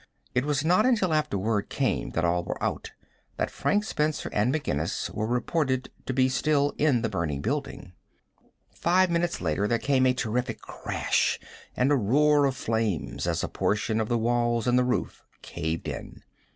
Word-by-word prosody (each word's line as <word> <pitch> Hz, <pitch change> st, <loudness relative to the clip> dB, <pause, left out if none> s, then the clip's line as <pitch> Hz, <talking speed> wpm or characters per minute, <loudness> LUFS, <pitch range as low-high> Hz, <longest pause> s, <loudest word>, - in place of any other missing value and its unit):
It 125 Hz, +2 st, +1 dB
was 145 Hz, 0 st, 0 dB
not 180 Hz, +8 st, +4 dB
until 210 Hz, -9 st, +2 dB
after 155 Hz, -9 st, +1 dB
word 105 Hz, +1 st, -1 dB
came -, -, -1 dB
that 85 Hz, -, +1 dB
all 85 Hz, +1 st, +1 dB
were -, -, -4 dB
out -, -, -2 dB, 0.5 s
that -, -, -1 dB
Frank 205 Hz, +1 st, +1 dB
Spencer 155 Hz, -7 st, -1 dB
and 105 Hz, +5 st, +2 dB
McGinnis 85 Hz, -, -2 dB
were 110 Hz, +1 st, -2 dB
reported 130 Hz, +2 st, 0 dB, 0.2 s
to -, -, 0 dB
be 130 Hz, -1 st, +4 dB
still 145 Hz, +2 st, +1 dB
in 140 Hz, -6 st, +3 dB
the -, -, +2 dB
burning 85 Hz, -8 st, -2 dB
building. 135 Hz, -, -4 dB, 0.8 s
Five 180 Hz, +1 st, +2 dB
minutes 170 Hz, 0 st, 0 dB
later 105 Hz, -, 0 dB
there 115 Hz, -, +2 dB
came 130 Hz, +1 st, +2 dB
a 125 Hz, -, +2 dB
terrific 125 Hz, 0 st, -2 dB
crash, -, -, -1 dB, 0.4 s
and 130 Hz, +3 st, +3 dB
a -, -, +5 dB
roar 145 Hz, +5 st, +3 dB
of 135 Hz, -1 st, 0 dB
flames 110 Hz, -7 st, -1 dB
as -, -, 0 dB
a -, -, 0 dB
portion 110 Hz, +2 st, 0 dB
of 110 Hz, -, -3 dB
the 120 Hz, -, +2 dB
walls 120 Hz, 0 st, +1 dB
and 125 Hz, 0 st, +3 dB
the -, -, +3 dB
roof 125 Hz, 0 st, -2 dB, 0.2 s
caved 80 Hz, +1 st, -4 dB
in. -, -, -7 dB
125 Hz, 180 wpm, -27 LUFS, 110-150 Hz, 0.8 s, a